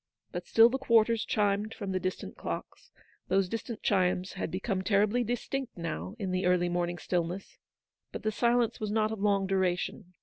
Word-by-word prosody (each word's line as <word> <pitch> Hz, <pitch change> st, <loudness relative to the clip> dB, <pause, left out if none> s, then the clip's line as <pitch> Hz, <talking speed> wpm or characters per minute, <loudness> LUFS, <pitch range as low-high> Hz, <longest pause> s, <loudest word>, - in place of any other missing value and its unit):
But -, -, -5 dB
still 225 Hz, 0 st, +7 dB
the 265 Hz, +3 st, -1 dB
quarters 230 Hz, -3 st, +3 dB
chimed 210 Hz, +1 st, 0 dB
from 195 Hz, -2 st, -4 dB
the 185 Hz, -, 0 dB
distant 185 Hz, 0 st, -4 dB
clocks: -, -, -6 dB, 0.4 s
those 190 Hz, 0 st, +2 dB
distant 230 Hz, +2 st, -5 dB
chimes 185 Hz, -1 st, +1 dB
had 195 Hz, -, -3 dB
become 190 Hz, +2 st, -2 dB
terribly 210 Hz, +5 st, +2 dB
distinct 245 Hz, +2 st, -3 dB
now 170 Hz, +4 st, -4 dB
in 195 Hz, -4 st, -3 dB
the 185 Hz, 0 st, 0 dB
early 180 Hz, -1 st, +3 dB
morning 175 Hz, 0 st, -1 dB
stillness. 175 Hz, +2 st, -3 dB, 0.5 s
But -, -, -6 dB
the 215 Hz, -, +1 dB
silence 235 Hz, +1 st, +2 dB
was 215 Hz, -, -2 dB
not 215 Hz, 0 st, +1 dB
of 220 Hz, -3 st, -5 dB
long 200 Hz, -1 st, +2 dB
duration. 185 Hz, -1 st, -1 dB
200 Hz, 175 wpm, -30 LUFS, 185-220 Hz, 0.5 s, still